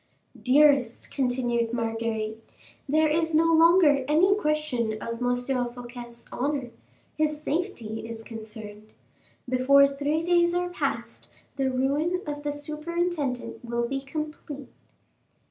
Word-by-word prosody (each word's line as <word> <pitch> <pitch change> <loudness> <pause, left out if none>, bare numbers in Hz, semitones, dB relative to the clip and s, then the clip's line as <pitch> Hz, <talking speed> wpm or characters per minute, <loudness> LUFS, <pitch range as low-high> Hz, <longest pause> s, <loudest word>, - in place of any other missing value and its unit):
"Dearest," 270 -3 +3
continued 245 -3 0
Marguerite, 225 -1 -3 0.4
"there 310 +2 +4
is 320 +1 +1
no 320 - +5
longer 325 -4 +6
any 335 +7 +4
question 300 - 0
of 230 +1 -5
M. 245 0 +2
Fouquet's 245 -1 -5
honor; 270 -2 -2 0.4
his 305 -1 0
safety 225 -11 -3
is 225 -1 -7
concerned. 215 -1 -10 0.5
Before 265 +2 +5
three 290 +3 -1
days 345 0 +3
are 355 0 0
passed 355 - -4 0.3
the 270 -1 0
ruin 290 +8 0
of 290 -1 -4
the 290 0 -2
superintendent 300 -2 -3
will 235 0 -1
be 270 +2 -2
complete." 295 -1 -6
275 Hz, 115 wpm, -26 LUFS, 240-305 Hz, 0.5 s, longer